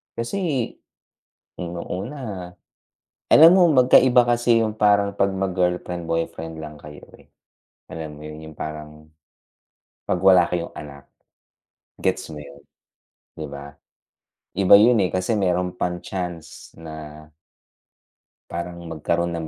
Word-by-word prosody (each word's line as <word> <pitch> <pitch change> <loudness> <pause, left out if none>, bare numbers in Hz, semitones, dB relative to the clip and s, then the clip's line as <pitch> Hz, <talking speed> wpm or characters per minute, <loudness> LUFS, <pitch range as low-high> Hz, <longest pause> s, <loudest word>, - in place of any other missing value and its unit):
Kasi 135 0 -2 0.9
nung 85 -1 -5
una 100 -3 -6 0.8
alam 160 +2 +9
mo 175 -3 +5
magk-aiba 125 -1 +5
kasi 120 -1 +3
'yung 110 -1 -1
parang 100 -1 +3
'pag 100 0 +2
mag-girlfriend/boyfriend 90 -3 -2
lang 75 -1 -8
kayo 75 0 -12
eh, - - -22 0.6
alam 80 -2 -7
mo - - -12
'yun? 75 0 -9
'Yung 80 - -14
parang 75 0 -8 1.0
'pag 90 - -1
wala 95 -2 +6
kayong 85 -1 -3
anak, 70 -1 -10 0.9
gets - - -1
mo 75 - -8
'yon? 70 0 -14 0.7
'Di 80 - -6
ba? 70 0 -9 0.8
iba 100 0 +6
'yun 115 +3 +5
eh 90 - -1
kasi 95 +5 0
meron 90 -1 0
pang 90 -1 -2
chance 90 -3 -7
na 80 -1 -10 1.2
Parang 85 0 -6
magkaroon 85 +1 -2
ng 80 - -5
90 Hz, 120 wpm, -22 LUFS, 80-100 Hz, 1.2 s, alam